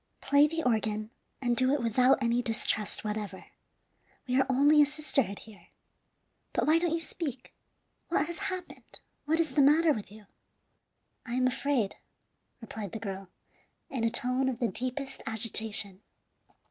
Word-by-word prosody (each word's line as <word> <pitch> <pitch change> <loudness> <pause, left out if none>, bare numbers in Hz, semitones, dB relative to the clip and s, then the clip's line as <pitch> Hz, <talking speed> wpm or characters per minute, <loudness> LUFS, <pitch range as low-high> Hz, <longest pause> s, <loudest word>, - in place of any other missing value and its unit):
Play 285 +2 +4
the 325 +1 -3
organ, 215 -3 0 0.3
and 240 -1 +2
do 255 +2 +3
it 275 - -3
without 250 +4 +4
any 235 +1 +2
distrust 220 -2 0
whatever. 210 -2 -4 0.8
We 250 - 0
are - - 0
only 290 +3 +5
a - - +7
sisterhood 275 -9 -1
here. 215 -2 -14 0.9
But - - +1
why 315 +2 +4
don't 335 -1 0
you 335 - -3
speak? 285 -6 -4 0.5
What 300 -3 +1
has 340 +1 -6
happened? 370 -1 -8 0.3
What 320 +2 +1
is 320 -4 +1
the 285 - +4
matter 305 +3 +5
with 210 -4 -7
you?" 210 0 -14 1.0
"I 235 - -6
am 255 0 +2
afraid," 255 -4 0 0.6
replied 220 -4 -7
the 225 - -4
girl, 195 -2 -6 0.6
in 255 -4 -2
a 230 - +3
tone 250 +3 0
of 250 - -3
the 240 -1 0
deepest 255 +6 -5
agitation. 220 -3 0
250 Hz, 155 wpm, -29 LUFS, 220-290 Hz, 1.0 s, a